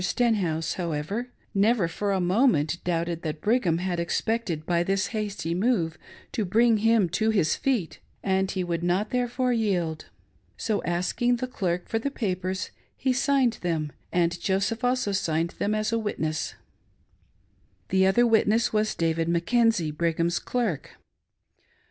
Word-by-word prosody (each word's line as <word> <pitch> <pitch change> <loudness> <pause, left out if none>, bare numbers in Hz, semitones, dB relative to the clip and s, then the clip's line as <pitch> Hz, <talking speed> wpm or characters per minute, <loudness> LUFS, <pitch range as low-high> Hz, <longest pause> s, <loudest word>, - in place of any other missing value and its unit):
Stenhouse, 180 -8 +1
however, 170 +9 -3 0.2
never 205 -2 +3
for 200 +4 -2
a 195 - +1
moment 175 - +2
doubted 170 -1 -1
that 155 -1 -4
Brigham 205 -6 +2
had 180 -1 -2
expected 170 -2 -1
by 170 0 +1
this 195 +2 +1
hasty 205 -6 -2
move 180 -5 0 0.3
to 220 - -1
bring 225 +4 +3
him 225 -2 +3
to 220 +6 +1
his 190 -8 +2
feet, 205 - -1 0.2
and 190 0 +1
he 190 -1 -2
would 170 -1 -2
not 180 +5 0
therefore 250 0 0
yield. 180 -8 -1 0.5
So, 215 -2 -1
asking 185 +8 +1
the 245 - -3
clerk 180 -8 -2
for 225 - -1
the 280 - -2
papers, 185 -6 -3 0.3
he 260 -1 +1
signed 260 -3 +2
them, 160 -4 -1 0.2
and 170 0 +1
Joseph 195 +5 0
also; 250 -4 +1
signed 170 -3 0
them 210 +1 +1
as 215 +1 -1
a 230 - +1
witness 160 -7 -2 0.7
— - - -39
the 190 0 +4
other 240 +6 +4
witness 225 0 +3
was 215 0 +1
David 165 0 0
Mackenzie, 175 0 +2
Brigham's 170 +2 0
clerk. 225 - -2
190 Hz, 150 wpm, -26 LUFS, 170-225 Hz, 0.7 s, the